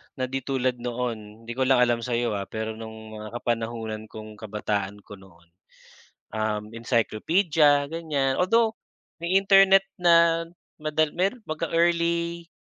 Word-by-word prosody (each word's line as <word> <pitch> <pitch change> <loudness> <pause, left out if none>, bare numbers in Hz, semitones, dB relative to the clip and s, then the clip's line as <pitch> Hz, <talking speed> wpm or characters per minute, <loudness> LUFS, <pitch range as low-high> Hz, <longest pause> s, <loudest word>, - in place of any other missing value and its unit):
na 130 - -3
di 130 +1 -2
tulad 130 -2 -1
noon. 115 -3 -5
'Di 115 - -7
ko 130 +2 0
lang 130 -2 +5
alam 120 -1 +2
sa 120 +1 -2
'yo 120 -1 0
ah, 100 -1 -3
pero 110 0 -4
no'ng 110 -1 -9
mga 105 - -7
kapanahunan 115 -2 -3
kong 110 0 -10
kabataan 105 -1 -3
ko 105 - -12
noon, 85 -3 -19 0.8
um, 105 -1 -2
encyclopedia, 145 - +2
ganyan. 145 -5 -1
Although 225 +5 +3 0.5
may 180 +3 +3
Internet 195 0 +6
na 170 -1 +4 0.4
madal 155 0 0
meron 195 +8 0
mag-e-early, 170 +1 0
125 Hz, 140 wpm, -25 LUFS, 110-165 Hz, 0.8 s, Internet